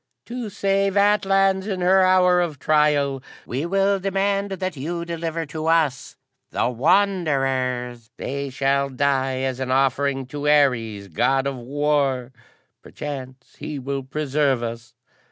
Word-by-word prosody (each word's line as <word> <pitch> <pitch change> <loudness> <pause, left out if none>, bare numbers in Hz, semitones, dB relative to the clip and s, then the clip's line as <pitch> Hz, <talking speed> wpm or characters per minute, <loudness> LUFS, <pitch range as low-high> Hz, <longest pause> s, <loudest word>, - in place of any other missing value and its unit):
"To 240 -2 -5
save 195 0 0
Atlans 195 -1 +3
in 190 -3 -3
her 190 +2 +4
hour 180 -1 +4
of 165 -4 -2
trial, 145 -2 +2 0.2
we 135 +7 -3
demand 195 +1 +1
that 185 -2 -3
ye 170 +5 -4
deliver 165 -1 -3
to 155 +1 -5
us 160 -6 +1 0.3
the - - 0
Wanderers. 130 - 0
They 140 0 -4
shall 140 +1 0
die 135 -1 0
as 130 -1 -2
an 130 -1 -3
offering 135 +1 +1
to 145 +1 -2
Ares, 115 -9 +2
God 135 - +1
of 140 -1 -2
War. 135 -1 0 0.5
Perchance 130 -3 -8
he 150 - -5
will 135 +1 -3
preserve 140 -2 0
us." 115 0 -6
145 Hz, 130 wpm, -22 LUFS, 130-180 Hz, 0.5 s, her